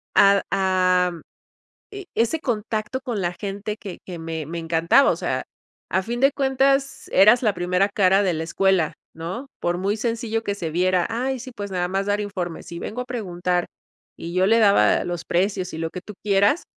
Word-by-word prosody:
a 200 0 +6
am, 185 -3 +2 0.7
e 405 -2 -8
ese 235 +8 +1
contacto 220 0 -2
con 245 -6 -3
la 175 -1 -1
gente 205 +1 -4
que 195 -5 -8
que 175 -3 -7
me 160 -2 -5
me 170 +2 -5
encantaba, 165 +10 +3
o - - 0
sea, - - -2 0.5
a 190 - +1
fin 240 +4 -4
de 275 +1 +5
cuentas, 275 0 +1
eras 215 +6 +6
la 210 -3 +2
primera 180 +2 +1
cara 195 -1 +3
de 185 -3 +1
la 160 +1 -3
escuela, 190 -2 +2 0.2
¿no? 180 - -6
Por 175 0 0
muy 200 +3 0
sencillo 225 0 -2
que 200 - -2
se 165 -5 -4
viera: 180 +1 +2
"Ay, 255 +4 -2
sí, 260 +2 -8
pues 205 -1 -5
nada 180 -1 -1
más 195 +2 -1
dar 205 +1 +1
informes 180 -6 -5
y 170 - -5
vengo 225 +7 -5
a 250 - -3
preguntar", 180 -7 -2 0.5
y 170 +1 -7
yo 185 +1 +3
le 225 +2 +4
daba 205 -2 +4
los 175 -1 -4
precios 185 +1 0
y 160 - -6
lo 165 0 -3
que 180 - -7
tú 210 - -9
quieras. 205 - +2
195 Hz, 195 wpm, -23 LUFS, 180-225 Hz, 0.7 s, a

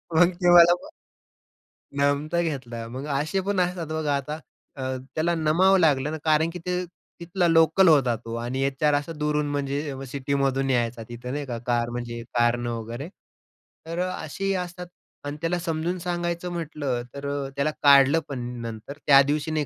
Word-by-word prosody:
मग 175 +2 +6
ते 175 0 +5
मला 175 0 +8 1.3
नमता 145 +4 +1
घेतला. 125 -8 -4
मग 130 +4 -6
असे 155 +6 -1
पण 200 -2 +1
असतात, 180 -2 -1
बघा. 155 -2 -1
आता 150 +3 -4 0.4
अ, 135 - -6 0.3
त्याला 170 +2 +1
नमावं 170 +5 +4
लागलं 150 -3 +3
ना, 160 - -3
कारण 155 +1 +3
की 180 - -7
ते 180 0 -1 0.4
तिथला 175 +1 0
लोकल 165 +3 +5
होता, 135 -6 +4
तो 115 0 -8
आणि 125 +3 -3
एचआर 140 +2 +1
असा 145 +3 -1
दूरून 150 0 0
म्हणजे 145 +1 -2
व 135 0 -7
सिटीमधून 135 -1 0
यायचा, 120 -2 0
तिथं, 120 +1 -7
नाही 145 0 -3
का, 120 -3 -4
कार 120 -1 +1
म्हणजे 120 -1 -5 0.2
कारनं 120 0 +2
वगैरे. 120 +7 -6 0.8
तर 165 +2 -4
अ, 185 - 0 0.2
असेही 195 +6 -2
असतात. 180 0 -8 0.4
आणि 145 +1 -4
त्याला 175 +1 0
समजून 170 +1 -2
सांगायचं 175 0 -3
म्हटलं, 150 -7 -3
तर 140 0 -6
अ, 140 -1 -3
त्याला 140 +2 +1
काढलं 140 +2 +7
पण 135 -3 -4 0.2
नंतर 115 +5 -7
त्या 140 -2 +8
दिवशी 150 +1 -1
नाही 155 -1 0
145 Hz, 170 wpm, -25 LUFS, 135-170 Hz, 1.3 s, मला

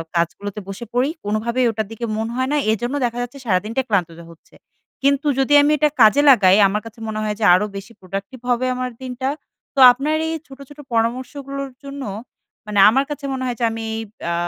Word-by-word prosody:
কাজগুলোতে 190 +5 -2
বসে 195 +4 -7
পড়ি। 250 +3 +2 0.2
কোনোভাবেই 235 +4 0
ওটার 220 -2 -3
দিকে 225 +1 -5
মনে 225 +1 -3
হয় 260 +1 -1
না, - - +2
এজন্য 240 +5 -2
দেখা 240 0 -3
যাচ্ছে 245 +3 -6
সারাদিনটা 215 +5 0
ক্লান্ত 190 -6 +1
যা 170 - -11
হচ্ছে। 165 - -21 0.5
কিন্তু 280 +2 +2
যদি 270 +2 +2
আমি 290 - +3
এটা 300 +1 +3
কাজে 220 +6 +6
লাগাই 195 -7 +6
আমার 210 +2 -2
কাছে 225 +1 -11
মনে 215 0 -3
হয় 210 -1 -2
যে 215 - +1
আরো 185 - +1
বেশি 200 +4 -10
প্রোডাক্টিভ 195 +6 -7
হবে 245 +1 +1
আমার 250 0 -3
দিনটা, 260 +1 -3 0.5
তো - - -1
আপনার 280 +5 -1
এই 320 - -2
ছোট, 270 0 -13
ছোট 290 0 -14
পরামর্শগুলোর 260 +4 -2
জন্য 280 0 -7 0.6
মানে 210 -1 -1
আমার 270 +5 +2
কাছে 295 -1 -6
মনে 260 -1 -3
হয় 245 -2 -3
যে - - -2
আমি 225 0 -5
এইব 225 -1 -6 0.2
আ - - 0
240 Hz, 205 wpm, -20 LUFS, 210-270 Hz, 0.6 s, কাজে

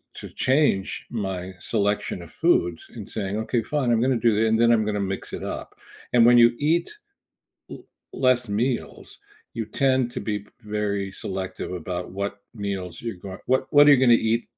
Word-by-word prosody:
to - - -8
change 130 -8 0
my 95 -4 -4
selection 105 -2 -1
of - - -12
foods 85 -2 +1
and 105 -3 -8
saying, 105 -1 -3
"Okay, 115 0 -1
fine. 140 -3 0
I'm 115 - +2
gonna 130 -1 +2
do 115 -1 +2
it, 115 - +3
and 110 +1 +2
then 120 0 +5
I'm 110 -1 +3
gonna 105 -1 -1
mix - - -8
it - - -5
up." - - -11 0.4
And 120 -1 +6
when 120 0 +7
you 120 0 +8
eat 165 - +1 0.8
l - - -7 0.5
less 125 -1 +4 0.2
meals, 125 -1 -2 0.5
you 115 - -1 0.2
tend 130 -1 +4
to - - -4
be 105 -1 -3 0.3
very 100 -2 -1 0.2
selective 95 -1 -5
about 90 +1 -5
what 100 0 -2 0.3
meals 90 -4 -4
you're 115 -4 -4
goin 95 -1 -7
what 130 - +3
what 145 0 +8
you're 145 - +8
gonna 120 - +7 0.2
eat 115 - 0
110 Hz, 180 wpm, -24 LUFS, 100-125 Hz, 0.8 s, you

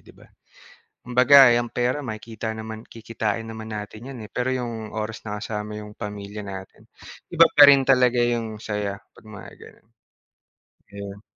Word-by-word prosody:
'di - - -19
ba? - - -18 0.8
Kumbaga, 125 +2 +7
eh, 120 - +4
ang 120 - -2
pera 125 +3 -1
makikita 110 -3 -6
naman 110 0 -8
kikitain 115 -1 -4
naman 110 -1 -7
natin 105 +2 -8
yan, - - -9
eh, 105 - -11
pero 130 +1 -1
yung 115 -4 -5
oras 110 0 -4
na 105 0 -4
kasama 105 -1 -5
yung 105 0 -13
pamilya 105 -1 -7
natin, 95 -1 -10 0.4
iba - - +6
pa 145 -1 +8
rin 140 -1 +7
talaga 125 -2 +3
yung 115 -3 -2
saya, 105 -1 -4
'pag - - -20
mga 100 - -10
gano'n. - - -16 1.1
Ayun. 100 0 -9
110 Hz, 165 wpm, -23 LUFS, 105-120 Hz, 1.1 s, pa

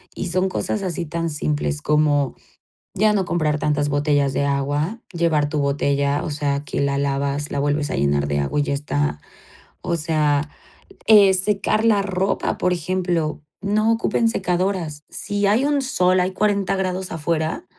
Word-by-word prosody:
y 190 - -3
son 185 +2 +1
cosas 200 +2 -2
así 175 -2 -3
tan 165 +2 -3
simples 150 0 -2
como 150 -3 +2 0.6
ya 215 +2 +3
no 195 -3 +1
comprar 155 -3 0
tantas 145 -1 0
botellas 145 -1 +1
de 140 - 0
agua, 145 - -1
llevar 160 -4 +1
tu 150 - -1
botella, 140 0 0
o 165 - -3
sea, 145 -1 -1
que - - -2
la 140 0 0
lavas, 140 +1 -1
la 140 - -1
vuelves 145 +1 0
a - - -1
llenar 70 +1 +1
de 70 0 0
agua 70 - -1
y - - +2
ya 140 - -2
está. 75 - -2 0.6
O 175 -2 -1
sea, 150 -2 +1 0.6
eh, 205 -3 +7
secar 205 +3 +1
la 210 -3 +4
ropa, 195 0 -1
por 180 - +1
ejemplo, 175 -3 -1 0.2
no 215 +3 +2
ocupen 230 0 +1
secadoras. 180 -6 -1
Si 205 0 -2
hay 230 +7 +3
un 290 -1 +1
sol, 185 -8 +2
hay 185 +1 0
40 200 -2 +1
grados 185 0 -2
afuera, 160 -3 -2
155 Hz, 170 wpm, -21 LUFS, 145-190 Hz, 0.6 s, eh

